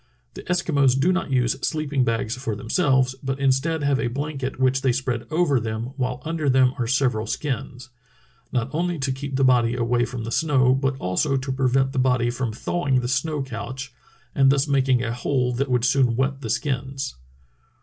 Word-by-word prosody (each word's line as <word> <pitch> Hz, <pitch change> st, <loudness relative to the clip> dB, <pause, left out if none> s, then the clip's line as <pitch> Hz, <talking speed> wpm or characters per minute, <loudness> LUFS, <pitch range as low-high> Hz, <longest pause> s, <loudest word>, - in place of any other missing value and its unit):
The -, -, -8 dB
Eskimos 140 Hz, -7 st, +2 dB
do 180 Hz, +7 st, +3 dB
not 185 Hz, -, -2 dB
use 125 Hz, -2 st, +1 dB
sleeping 150 Hz, -4 st, 0 dB
bags 115 Hz, -1 st, -1 dB
for 125 Hz, -4 st, -4 dB
themselves, 130 Hz, -, +1 dB
but 135 Hz, 0 st, -3 dB
instead 140 Hz, +4 st, +1 dB
have 140 Hz, -1 st, +2 dB
a 135 Hz, -, 0 dB
blanket 135 Hz, +1 st, -4 dB
which 130 Hz, 0 st, +2 dB
they 135 Hz, -2 st, +2 dB
spread 125 Hz, -2 st, -2 dB
over 155 Hz, -4 st, +2 dB
them, 110 Hz, +2 st, -4 dB
while 125 Hz, -1 st, -3 dB
under 160 Hz, -3 st, -1 dB
them 130 Hz, -1 st, +4 dB
are 120 Hz, -, 0 dB
several 125 Hz, -4 st, +1 dB
skins, 130 Hz, -3 st, -4 dB, 0.6 s
not 125 Hz, 0 st, -1 dB
only 175 Hz, +2 st, -1 dB
to 135 Hz, -2 st, -1 dB
keep 135 Hz, +1 st, -5 dB
the 135 Hz, -, +2 dB
body 125 Hz, -2 st, +3 dB
away 120 Hz, 0 st, +1 dB
from 120 Hz, -2 st, -6 dB
the 115 Hz, -, -5 dB
snow, 130 Hz, -3 st, +3 dB
but 135 Hz, 0 st, 0 dB
also 135 Hz, +8 st, 0 dB
to 130 Hz, +1 st, -3 dB
prevent 135 Hz, 0 st, +1 dB
the 135 Hz, -, -1 dB
body 125 Hz, -2 st, +2 dB
from 120 Hz, -1 st, -3 dB
thawing 135 Hz, +3 st, 0 dB
the 120 Hz, -, -3 dB
snow 140 Hz, +3 st, -1 dB
couch 130 Hz, +1 st, -6 dB, 0.4 s
and 135 Hz, -1 st, +4 dB
thus 140 Hz, +1 st, +2 dB
making 130 Hz, -3 st, +2 dB
a 115 Hz, -1 st, -2 dB
hole 125 Hz, 0 st, 0 dB
that 135 Hz, +3 st, -1 dB
would 125 Hz, -1 st, +2 dB
soon 130 Hz, -2 st, +3 dB
wet 135 Hz, +2 st, -1 dB
the 115 Hz, -, -5 dB
skins. 135 Hz, +1 st, -2 dB
130 Hz, 190 wpm, -23 LUFS, 125-140 Hz, 0.6 s, them